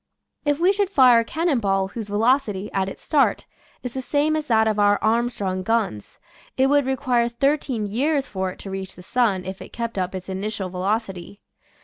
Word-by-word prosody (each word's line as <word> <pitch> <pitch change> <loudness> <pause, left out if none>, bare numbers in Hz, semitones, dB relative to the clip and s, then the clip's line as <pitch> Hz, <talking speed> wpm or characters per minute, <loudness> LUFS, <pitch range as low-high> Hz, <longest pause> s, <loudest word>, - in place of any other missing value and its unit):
If 290 0 +1
we 365 +3 +4
should 405 -1 0
fire 255 - +6
a - - +1
cannon 315 +2 0
ball 195 -2 0
whose 220 0 -6
velocity, 210 -2 +1
at 190 0 0
its - - -11
start, 295 -3 +2 0.4
is 250 -2 -5
the 265 - -3
same 295 +4 +1
as 305 -1 -3
that 220 -2 +3
of 215 -1 0
our 205 0 +4
Armstrong 215 -5 0
guns, 205 - -2 0.4
it 260 - +4
would 285 -2 +3
require 250 -3 +1
thirteen 265 -2 0
years 275 +7 0
for 190 -1 -3
it 185 - -9
to 195 - -7
reach 190 0 -6
the 180 - -13
sun 205 -4 +1
if 190 +1 -6
it - - -10
kept 230 -3 -3
up 185 +1 -2
its 185 -1 -7
initial 195 0 -3
velocity. 195 +1 -3
225 Hz, 200 wpm, -23 LUFS, 195-265 Hz, 0.4 s, fire